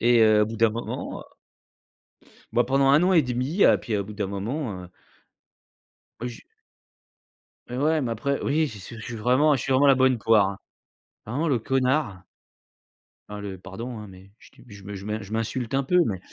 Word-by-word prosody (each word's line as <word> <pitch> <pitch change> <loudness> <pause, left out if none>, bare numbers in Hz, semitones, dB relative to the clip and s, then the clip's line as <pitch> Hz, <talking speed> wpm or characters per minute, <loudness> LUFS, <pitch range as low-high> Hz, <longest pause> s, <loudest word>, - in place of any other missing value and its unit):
Et 120 0 +4
heu, 110 -1 +5
au - - +1
bout 115 0 -6
d'un 115 0 +3
moment, 115 +2 -5
heu - - -10 1.3
Bah, 120 0 +2
pendant 135 +3 +4
an 185 +1 +3
1/2, 135 +3 +1
heu - - +7
et - - +2
puis 110 -3 -3
au 100 - -1
bout 105 +2 -9
d'un 100 -1 -3
moment, 100 +1 -4
heu - - -10 1.3
Heu, 125 - -3
j 115 - -12 1.3
Mais 125 - -5
ouais, 155 +3 +2
mais 120 -3 -2
après, 140 +5 -2
oui, 155 +2 +1
j'y 110 -6 -9
suis 115 +5 -10
je 115 - -9
suis 120 - -6
vraiment 130 +7 +3
je 130 - -3
suis 135 - -3
vraiment 135 +2 +4
la 135 - +7
bonne 130 -1 +3
poire, 110 -2 +3
hein. 100 - -7 0.7
Vraiment 135 +9 -2
le 135 -5 +2
connard! 130 -5 0 1.1
Enfin, 105 0 -6
le 100 -2 -6
pardon, 110 +7 -7
hein, 105 - -9
mais 95 0 -15
je - - -18
tu - - -19
je 100 -3 -13
me 100 +1 -7
je 95 0 -8
m'in 105 +1 -3
je 100 0 -11
m'insulte 115 +2 -3
un 135 0 +2
peu 180 +7 +2
mais 95 -4 -2
115 Hz, 210 wpm, -25 LUFS, 105-135 Hz, 1.3 s, heu